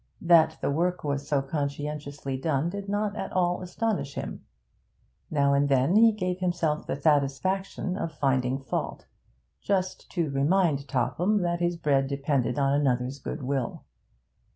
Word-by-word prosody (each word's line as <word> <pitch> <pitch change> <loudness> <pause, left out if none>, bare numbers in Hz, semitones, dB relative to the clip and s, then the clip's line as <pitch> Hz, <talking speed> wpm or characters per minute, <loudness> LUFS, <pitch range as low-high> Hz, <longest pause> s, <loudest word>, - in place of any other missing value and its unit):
That 160 -2 +5
the - - 0
work 175 +4 0
was 140 -1 -2
so 140 -2 +1
conscientiously 145 -1 -4
done 150 +3 0
did 200 0 -6
not 205 0 -1
at - - -4
all 180 -1 +1
astonish 180 -5 -2
him. - - -5 0.9
Now 140 -2 +2
and 140 +1 +2
then 135 +6 +3
he 225 +1 +7
gave 185 -3 -2
himself 175 -4 -1
the - - -1
satisfaction 155 +7 0
of 165 - -3
finding 135 -3 +1
fault: - - -3 0.6
just 185 -2 -1
to 165 -5 0
remind 145 0 +2
Topham 155 - +1
that 175 0 0
his 175 0 0
bread 140 -4 +2
depended 140 -1 0
on 140 -1 +2
another's 135 -1 0
goodwill. 135 -1 -3
150 Hz, 145 wpm, -27 LUFS, 140-180 Hz, 0.9 s, he